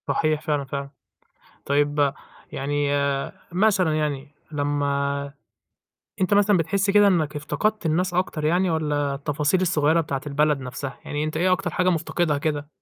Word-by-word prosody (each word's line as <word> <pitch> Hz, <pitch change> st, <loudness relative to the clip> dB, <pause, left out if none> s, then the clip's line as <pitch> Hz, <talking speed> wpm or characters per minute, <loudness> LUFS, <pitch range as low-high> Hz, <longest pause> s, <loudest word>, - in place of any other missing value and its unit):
صحيح، 155 Hz, -1 st, +1 dB
فعلًا 145 Hz, -2 st, -1 dB
فعلًا. 140 Hz, +1 st, -5 dB, 0.8 s
طيب، 145 Hz, 0 st, +2 dB, 0.4 s
يعني 145 Hz, +1 st, -1 dB, 0.6 s
مثلًا 185 Hz, -4 st, +2 dB
يعني 145 Hz, -1 st, -3 dB, 0.2 s
لمّا 140 Hz, -1 st, -1 dB, 0.9 s
أنت 190 Hz, +2 st, +2 dB
مثلًا 205 Hz, 0 st, +4 dB
بتحس 195 Hz, +4 st, +1 dB
كده 205 Hz, 0 st, +6 dB
إنك 155 Hz, -6 st, +1 dB
افتقدت 210 Hz, +7 st, -1 dB
الناس 175 Hz, +3 st, 0 dB
أكتر 175 Hz, -4 st, -1 dB
يعني 175 Hz, +4 st, +2 dB
والّا 145 Hz, -3 st, 0 dB
التفاصيل 145 Hz, +5 st, 0 dB
الصغيرة 165 Hz, -3 st, +2 dB
بتاعة 140 Hz, -4 st, -3 dB
البلد 150 Hz, 0 st, +1 dB
نفسها، 130 Hz, +2 st, -6 dB
يعني 150 Hz, +1 st, -2 dB
أنت 155 Hz, 0 st, -3 dB
إيه 180 Hz, +3 st, +2 dB
أكتر 185 Hz, 0 st, 0 dB
حاجة 180 Hz, 0 st, +1 dB
مفتقدها 165 Hz, -2 st, 0 dB
كده؟ 145 Hz, -1 st, -2 dB
150 Hz, 140 wpm, -24 LUFS, 145-180 Hz, 0.9 s, كده